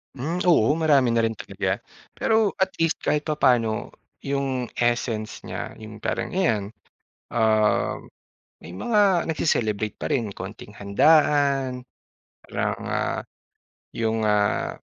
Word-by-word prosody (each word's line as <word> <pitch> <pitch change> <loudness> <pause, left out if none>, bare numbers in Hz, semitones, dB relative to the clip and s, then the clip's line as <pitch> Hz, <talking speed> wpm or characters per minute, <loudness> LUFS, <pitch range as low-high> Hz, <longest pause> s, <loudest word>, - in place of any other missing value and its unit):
Hmm, 145 +7 -3
oo 130 -9 +5
marami 140 -5 +4
na 115 - +3
rin 115 - -1
talaga. - - -3 0.5
Pero 225 - 0 0.3
at 190 - +4
least 165 -1 +2
kahit 150 0 +1
papano 125 -6 +3 0.6
'yung 140 -1 0 0.4
essence 115 -2 -1
niya - - -6 0.2
'yung 110 0 -9
parang - - -1
ayan, 110 - +2 0.7
ah, 110 -2 +2 0.7
may 85 - -11
mga 225 -3 +1 0.3
nagse-celebrate 110 -9 0
pa - - -3
rin. 120 -4 +1
Konting 105 +1 -8
handaan 140 +3 +3 0.7
parang, - - -2 0.2
ah, - - -1 0.8
'yung, 115 -1 0
ah, 105 0 +1
120 Hz, 115 wpm, -24 LUFS, 110-145 Hz, 0.8 s, oo